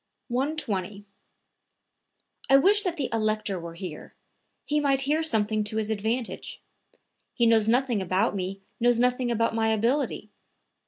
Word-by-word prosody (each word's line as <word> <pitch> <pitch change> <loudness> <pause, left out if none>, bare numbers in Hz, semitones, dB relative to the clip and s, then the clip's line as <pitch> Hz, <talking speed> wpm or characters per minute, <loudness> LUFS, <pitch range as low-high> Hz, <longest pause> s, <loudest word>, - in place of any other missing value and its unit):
120. 215 - -2 1.4
"I - - +4
only 275 - +5
wish 415 +2 +5
that 360 -4 -2
the 275 -4 -1
Elector 215 -3 -1
were 170 0 -8
here; 170 -4 -8 0.5
he 300 +1 +1
might 275 -2 +1
hear 295 +4 +1
something 220 -7 +1
to 215 +1 -2
his 220 0 -1
advantage. 220 +3 -3 0.8
He 240 - +2
knows 225 -2 +4
nothing 240 -2 +2
about 190 +4 0
me, 195 +1 -4 0.2
knows 240 0 +3
nothing 250 0 +1
about 230 -1 +1
my 225 0 +1
ability. 225 0 0
225 Hz, 145 wpm, -26 LUFS, 210-265 Hz, 1.4 s, only